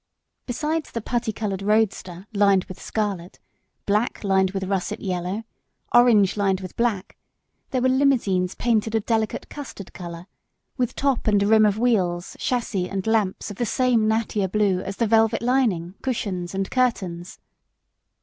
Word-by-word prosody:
Besides 305 +5 -2
the 230 - -4
putty 235 0 -2
coloured 200 -3 -3
roadster 195 -3 0
lined 200 -2 +4
with 185 - -11
scarlet, 200 -5 -3 0.5
black 210 +4 0
lined 190 -1 +3
with 195 0 -3
russet 190 -1 -2
yellow, 185 +2 -3 0.5
orange 225 -6 +5
lined 195 -2 +1
with 185 -2 -8
black; 225 -5 -1 0.5
there 255 -2 -1
were 260 - +4
limousines 235 -9 +2
painted 225 -2 0
a - - +4
delicate 220 0 -1
custard 260 -9 -9
colour, 170 -1 -8 0.5
with 250 -3 -1
top 275 -5 0
and 205 -2 +4
rim 215 +1 +5
of 205 0 0
wheels, 190 -7 0
chassis 205 -7 -1
and 195 -1 -3
lamps 220 -3 0
of 200 - -9
the 240 - 0
same 240 -2 +2
Nattier 215 -3 0
Blue 205 -3 +2
as 195 +1 -6
the 230 - +2
velvet 225 +1 +3
lining, 225 -9 +1
cushions 195 -8 -3
and 195 0 -2
curtains. 190 -9 -1
210 Hz, 150 wpm, -23 LUFS, 190-235 Hz, 0.5 s, orange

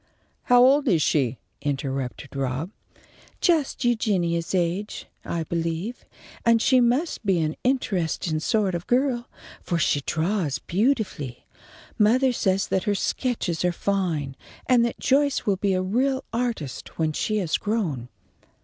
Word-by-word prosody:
"How 245 0 +6
old 280 +2 +4
is 170 -9 +3
she?" 130 -5 +1 0.2
interrupted 135 -1 -3
Rob. 135 +6 -2 0.7
"Just 315 -7 +1
Eugenia's 190 -8 +1
age, 180 +4 -1 0.2
I 170 -1 -2
believe, 170 +7 -3 0.4
and 230 -1 +4
she 255 +2 +4
must 250 +5 +1
be 190 -4 +2
an 155 -1 -1
interestin' 180 -10 0
sort 200 +3 +1
of 175 0 -4
girl, 250 -1 +1 0.3
for 175 - -1
she 145 -3 +2
draws 160 0 -1
beautifully. 190 - -1 0.5
Mothah 250 +5 +4
says 195 -4 +1
that 190 - 0
her 205 -2 +1
sketches 195 -6 -1
are 180 - +3
fine, 170 -8 -1 0.3
and 245 -2 +4
that 235 - -2
Joyce 280 0 +2
will 200 -3 +2
be 195 0 +1
a 185 - 0
real 260 +7 0
artist 230 - -3
when 160 -1 0
she 215 +7 -1
is 175 -6 0
grown." 170 - -2
195 Hz, 140 wpm, -25 LUFS, 160-240 Hz, 0.7 s, How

